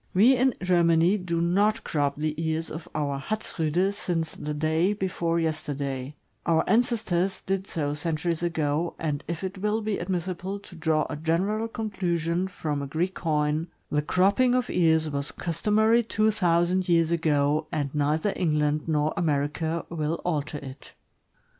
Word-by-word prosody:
We 235 +8 +6
in 255 -1 +2
Germany 175 +1 +4
do 170 -2 -2
not 200 +6 +2
crop 145 -2 0
the 155 +1 -1
ears 160 0 -2
of 160 +1 -7
our 140 -2 -1
Hatzriide 180 0 -1
since 170 -5 -2
the 150 0 -5
day 160 +6 +1
before 175 -4 -1
yester 155 -3 -2
day; 135 0 -4 0.3
our 165 -1 +3
ancestors 220 -6 +1
did 195 0 -1
so 145 -4 -2
centuries 160 +2 -1
ago, 165 -1 -1
and 150 -2 -2
if 170 +2 -4
it 190 0 -4
will 210 +2 0
be 210 -1 -1
admissible 185 +2 -3
to 190 - -13
draw 160 -1 +1
a - - -4
general 185 +8 0
conclusion 180 -6 -1
from 150 -6 -3
a 140 - -4
Greek 170 +6 -1
coin, 155 -1 0 0.2
the 150 - +2
cropping 200 - +3
of 250 -1 0
ears 160 -2 +3
was 140 -1 -2
customary 215 +7 +2
two 215 -1 +1
thousand 180 -1 +2
years 165 -1 +3
ago, 155 -2 +1
and 140 -2 -2
neither 150 +6 +1
England 150 -3 +1
nor 155 -1 +1
America 160 +1 -1
will 160 0 -2
alter 150 -3 -1
it. 135 -2 -10
165 Hz, 155 wpm, -26 LUFS, 150-190 Hz, 0.3 s, We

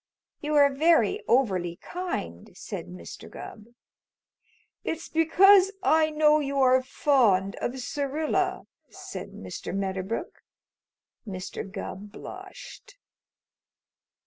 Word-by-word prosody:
"You 300 +1 -2
are 285 -1 +5
very 335 +7 +3
overly 190 -9 +2
kind," 255 - -6
said - - -6
Mr. 85 -1 -10
Gubb. 215 - -10 1.2
"It's 325 +1 -4
because 380 +4 +5
I 315 0 +4
know 305 0 +4
you 280 -1 -2
are 260 -1 +5
fond 235 -8 +2
of 255 - -3
Syrilla," 310 +8 -1 0.2
said - - -8
Mr. - - -7
Medderbrook. 195 +2 -3 0.9
Mr. 190 0 -6
Gubb 200 +1 -7
blushed. - - -11
275 Hz, 95 wpm, -27 LUFS, 195-320 Hz, 1.2 s, are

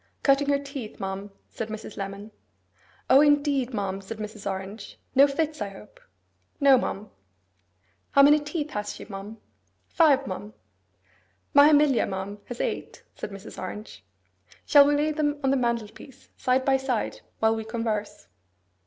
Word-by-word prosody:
Cutting 280 0 +3
her 285 - +4
teeth, 275 -5 -8
ma'am,' 195 +1 -5 0.2
said 225 - -5
Mrs. 215 -1 -8
Lemon. 200 +2 -6 0.8
'O, 270 +2 +7
indeed, 285 -3 +2
ma'am!' 195 -3 -3
said 205 +3 -8
Mrs. 215 -1 -6
Orange. 195 +2 -7 0.2
'No 275 +2 +7
fits, 305 0 -2
I 205 - -2
hope?' 350 - -14 0.6
'No, 280 -2 +7
ma'am.' 210 -3 -4 1.0
'How 280 - +6
many 295 +2 +7
teeth 295 +1 -4
has 210 0 -4
she, - - -10
ma'am?' 200 +2 -8 0.5
'Five, 285 -5 +3
ma'am.' 205 +1 -7 1.0
'My 285 +1 +8
Emilia, 295 -4 +4
ma'am, 195 +1 -5
has 245 - -8
eight,' - - -4
said - - -7
Mrs. 200 +1 -10
Orange. 210 +1 -8 0.6
'Shall 285 -1 +7
we 290 - +3
lay 300 +2 +1
them 295 -1 -1
on 270 - +2
the - - +3
mantelpiece 235 0 -4
side 260 +1 +1
by 270 -1 +4
side, 265 -4 -2 0.2
while 220 0 +2
we 220 - -4
converse? 220 -2 -3
235 Hz, 155 wpm, -26 LUFS, 210-285 Hz, 1.0 s, My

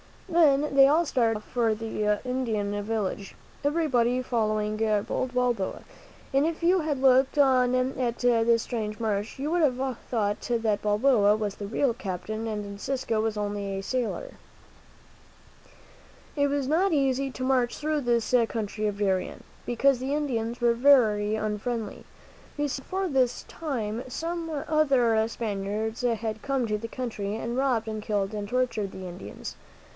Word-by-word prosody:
Then 300 -5 +3
they 270 0 +8
all 320 +4 +3
started 230 -6 +1
off 210 - -11
for 230 -3 +1
the 210 -1 -1
Indian 220 -5 -1
village, 205 -2 -3 0.3
everybody 260 -5 +2
following 215 -3 0 0.3
bold 255 -1 -2
Balboa, 245 -6 0 0.5
and 275 +2 +3
if 330 +1 -3
you 365 +2 +4
had 300 -5 -2
looked 265 +2 +4
on 255 -3 +4
at 255 -2 0
this 235 -2 +3
strange 215 -3 -4
march, 215 0 -2
you 285 +3 -2
would 350 0 +2
have 260 -3 +1
thought 210 -4 0
that 225 -3 +1
Balboa 210 0 +3
was 210 -2 -3
the 205 - -6
real 240 +4 +1
captain 215 +3 -4
and 210 -2 -3
Encisco 220 +2 -2 0.2
only 205 -1 -3
a 195 - -5
sailor. 255 - -3 2.0
It 285 0 +3
was 285 -1 -1
not 335 +6 +2
easy 275 -1 +1
to 255 - -6
march 255 -2 +1
through 305 0 -1
this 235 -2 0
country 215 -1 -3
of 205 -1 -3
Darien, 190 -3 -1 0.2
because 250 +2 +3
the 270 +3 -1
Indians 240 -5 -2
were 235 -1 +4
very 225 -5 +4
unfriendly. 215 +2 -3 0.5
You 290 0 0
see, 270 - -4
before 375 +6 -2
this 255 -4 +1
time 235 -8 -4
some 330 +5 -4 0.2
other 250 -8 +3
Spaniards 215 0 -3
had 225 -3 -1
come 275 -3 0
to 210 -1 0
the 230 +2 -6
country, 220 -4 -4
and 230 +1 -3
robbed 255 -5 +1
and 215 -1 -4
killed 205 -2 -1
and 205 -1 -4
tortured 235 -4 -1
the 185 -1 -7
Indians. 180 +1 -8
235 Hz, 150 wpm, -27 LUFS, 215-270 Hz, 2.0 s, they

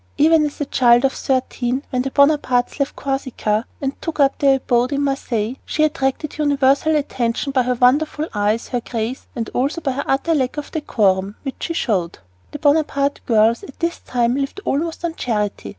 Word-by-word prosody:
Even 310 0 +4
as 290 - -10
a 290 - -1
child 245 -1 +4
of 265 - +1
thirteen, 260 0 -1
when 255 -2 0
the 270 - -2
Bonapartes 280 -3 +2
left 280 0 -1
Corsica 260 -5 -2
and 275 0 -4
took 325 -2 -5
up 275 -1 +3
their 275 -1 +5
abode 250 -1 +1
in 285 0 0
Marseilles, 255 -4 -2
she 310 - 0
attracted 300 0 -1
universal 285 +1 +3
attention 260 -2 -1
by 265 -1 +2
her 250 0 0
wonderful 295 +5 +2
eyes, 210 +2 0
her 245 -2 -1
grace, 230 +2 -4
and 230 -3 -4
also 275 +6 0
by 285 -4 -1
the 280 +2 -4
utter 280 +5 +1
lack 265 -2 0
of 295 - -5
decorum 200 -9 0
which 270 -2 -5
she 335 - -3
showed. 185 - -1 0.3
The - - -7
Bonaparte 285 -1 +1
girls 225 0 +3
at 270 - -12
this 340 0 -1
time 240 -1 0
lived 275 +7 -3
almost 325 +4 -1
on 335 - -2
charity. 210 - -2
270 Hz, 185 wpm, -20 LUFS, 240-290 Hz, 0.3 s, their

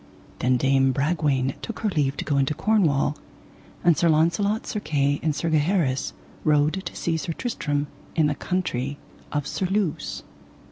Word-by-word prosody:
Then 125 0 +3
Dame 135 +1 +3
Bragwaine 140 -3 +1
took 230 - -6
her 215 - +1
leave 145 -6 0
to - - -3
go 145 - +1
into 140 +2 +1
Cornwall, 160 -10 +2 0.7
and 170 -2 +5
Sir 170 +4 +3
Launcelot, 170 +7 +2
Sir 210 - -3
Kay, 145 -5 +1
and 155 -2 0
Sir 165 +1 -1
Gaheris 150 -4 +1 0.3
rode 155 +4 +2
to - - -8
seek 165 -1 -1
Sir 165 +2 -3
Tristram 145 - -2 0.3
in 160 - +4
the 150 - +2
country 145 -5 -2 0.3
of 145 -2 -1
Surluse. 190 0 -1
150 Hz, 155 wpm, -25 LUFS, 140-175 Hz, 0.7 s, and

